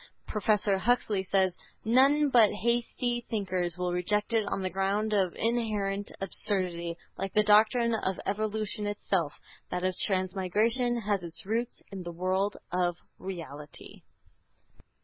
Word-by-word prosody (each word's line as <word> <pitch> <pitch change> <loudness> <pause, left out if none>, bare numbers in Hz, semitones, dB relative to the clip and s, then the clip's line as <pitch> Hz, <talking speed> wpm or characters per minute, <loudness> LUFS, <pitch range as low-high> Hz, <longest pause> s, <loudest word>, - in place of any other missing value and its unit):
Professor 210 -2 +1
Huxley 215 -2 +1
says: 190 -1 +2 0.3
"None 275 +6 +5
but 230 -4 +6
hasty 240 +2 -1
thinkers 185 -5 -1
will 180 -1 -1
reject 210 +5 +1
it 220 -2 +2
on 195 - -2
the 185 - 0
ground 200 +3 0
of 190 -4 +1
inherent 210 -4 -1
absurdity. 180 -4 -1 0.2
Like 195 0 -3
the 210 - +4
doctrine 220 +3 +4
of 195 -4 -1
evolution 215 +1 -2
itself, 190 -6 -1 0.3
that 180 0 -3
of 185 -1 0
transmigration 210 +6 +1
has 205 -2 0
its 170 0 -7
roots 230 +4 -2
in 195 -1 -6
the 175 -1 -6
world 185 +4 0
of 175 -1 +1 0.2
reality." 160 -6 -8
200 Hz, 130 wpm, -29 LUFS, 185-220 Hz, 0.3 s, but